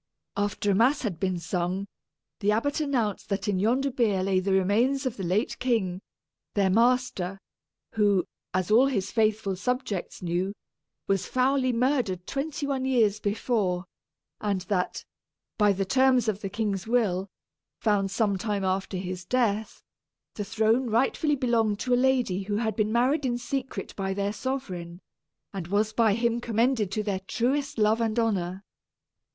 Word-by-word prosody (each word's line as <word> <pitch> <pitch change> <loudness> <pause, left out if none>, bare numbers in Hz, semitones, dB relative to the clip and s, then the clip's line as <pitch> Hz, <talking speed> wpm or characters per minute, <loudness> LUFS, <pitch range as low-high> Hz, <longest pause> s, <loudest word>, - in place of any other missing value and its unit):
After 205 0 0
a - - +3
mass 255 +9 +3
had 190 -8 -3
been 185 -2 0
sung, 180 +3 -2 0.5
the 210 0 +2
abbot 285 +9 0
announced 245 -9 -1
that 195 -1 -2
in 195 -3 +1
yonder 255 +7 +1
bier 215 -7 +1
lay 190 -1 +2
the 195 +1 -1
remains 225 +9 +2
of 255 - -1
the - - -7
late 185 +6 0
king, 195 -8 0 0.5
their 195 -2 +3
master, 230 -4 +1 0.5
who, 205 -4 +2 0.3
as 185 +2 -1
all 245 +5 +6
his 205 -7 -1
faithful 215 -3 +1
subjects 205 -3 -3
knew, 180 +3 -1 0.5
was 195 -2 0
foully 255 0 +2
murdered 235 -7 0
twenty 285 +1 -3
one 275 -2 -1
years 225 -6 +2
before; 205 -4 0 0.5
and 200 -3 -1
that, 180 -1 -2 0.5
by 210 -1 +5
the 195 0 -1
terms 260 +1 +3
of 210 -1 -1
the 195 - -3
king's 205 -2 -2
will, 205 -6 +1 0.5
found 205 -3 +1
some 200 -1 0
time 205 -2 -1
after 190 0 -1
his 180 -1 -5
death, 220 -1 -1 0.5
the 210 - -4
throne 220 +4 +1
rightfully 270 +6 +2
belonged 230 -5 +1
to 250 +4 -1
a - - +6
lady 250 -7 +2
who 205 +1 -3
had 220 0 -1
been 215 -1 0
married 255 +6 +2
in 245 -2 0
secret 265 +2 -4
by 195 -1 -2
their 200 +1 -1
sovereign, 185 -9 -4 0.5
and 190 -4 -5
was 210 +3 +1
by 220 -3 +3
him 235 0 0
commended 230 -3 +1
to 215 +2 -1
their 200 -2 -1
truest 275 +4 0
love 220 +1 +3
and 225 0 0
honor. 195 -5 0
215 Hz, 160 wpm, -27 LUFS, 195-245 Hz, 0.5 s, all